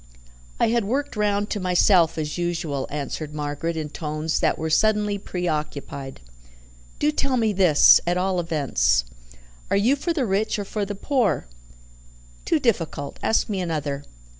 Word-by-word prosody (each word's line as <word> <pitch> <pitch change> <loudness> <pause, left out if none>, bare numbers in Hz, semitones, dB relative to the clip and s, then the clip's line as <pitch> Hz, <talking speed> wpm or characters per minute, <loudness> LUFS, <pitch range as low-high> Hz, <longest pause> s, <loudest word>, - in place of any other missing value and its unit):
"I - - +3
had 235 0 +1
worked 280 +7 -2
round 205 -1 0
to 210 - -1
myself, 180 -2 +3
as 150 -1 -3
usual," 165 -6 -2
answered 150 +1 -5
Margaret 150 +3 -3
in 155 -1 -3
tones 155 +1 -2
that - - +1
were 160 0 -3
suddenly 210 +2 +2
preoccupied. 150 - -4 0.8
"Do 300 - +2
tell 275 -3 0
me 220 -3 +1
this, 180 -6 +6
at 175 +1 +1
all 185 0 0
events. 125 - +1 0.6
Are - - +2
you 235 +8 +3
for 300 +5 -2
the 300 -6 0
rich 210 +2 0
or 205 - -4
for 205 +1 -3
the 205 +1 -5
poor?" 210 - 0 1.0
"Too 325 - +2
difficult. 165 - -1
Ask 220 - +1
me 195 -3 -2
another. 150 -5 -3
180 Hz, 155 wpm, -23 LUFS, 150-210 Hz, 1.0 s, this